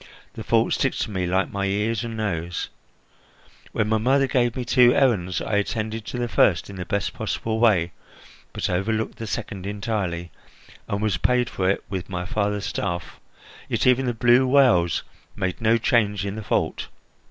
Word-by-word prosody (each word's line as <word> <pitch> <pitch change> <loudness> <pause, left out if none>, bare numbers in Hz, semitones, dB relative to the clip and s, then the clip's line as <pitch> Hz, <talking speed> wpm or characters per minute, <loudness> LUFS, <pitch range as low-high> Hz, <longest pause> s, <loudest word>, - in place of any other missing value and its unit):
The - - -7
fault - - +2
sticks - - 0
to - - -5
me 95 -2 -1
like 95 +2 0
my 100 0 -1
ears 105 +3 0
and 115 -1 -5
nose. 85 -6 -3 1.0
When 105 - 0
my 110 0 +2
mother 135 +5 +3
gave 120 -3 +1
me 125 - -3
two 125 -1 +5
errands, 100 -10 +2
I 105 - 0
attended 110 +1 -2
to - - -4
the 120 0 -1
first 105 - +2
in 100 - -9
the 90 - -5
best 100 -1 -1
possible 110 0 -2
way, 95 -7 +3 0.6
but - - -2
overlooked 110 +5 -1
the 115 - -5
second 100 -4 -5
entirely, 100 -5 -3 0.6
and 100 +1 -2
was 105 -5 +1
paid 125 +6 +1
for 95 -1 0
it 100 - 0
with 95 -3 -5
my 90 -1 -3
father's 105 +1 -1
staff, 85 -3 -4 0.5
yet - - 0
even 125 +1 +4
the 120 - -1
blue 120 +3 +4
wales 125 - +4 0.3
made 95 -1 -3
no 115 +1 +4
change 105 -4 +1
in 100 - -3
the 110 - -5
fault. - - -1
105 Hz, 180 wpm, -24 LUFS, 95-115 Hz, 1.0 s, two